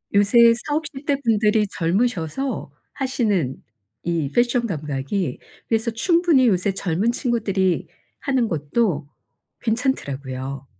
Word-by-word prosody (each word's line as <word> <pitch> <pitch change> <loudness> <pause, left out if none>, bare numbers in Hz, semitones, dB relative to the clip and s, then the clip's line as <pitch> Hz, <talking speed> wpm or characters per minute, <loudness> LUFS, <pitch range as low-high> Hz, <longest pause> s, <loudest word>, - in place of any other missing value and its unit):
요새 230 +3 +6
40-50 295 -2 -3
대 285 - +2
분들이 215 -2 +2
젊으셔서 190 - -1 0.2
하시는 210 - 0 0.5
이 165 -5 -1
패션 240 0 +2
감각이 150 - -2 0.3
그래서 225 +1 0
충분히 330 +1 +3
요새 195 -1 +2
젊은 195 +4 0
친구들이 205 -7 0 0.3
하는 265 -5 +1
것도 160 -1 -1 0.5
괜찮더라고요. 140 - -2
210 Hz, 240 characters per minute, -22 LUFS, 165-245 Hz, 0.5 s, 요새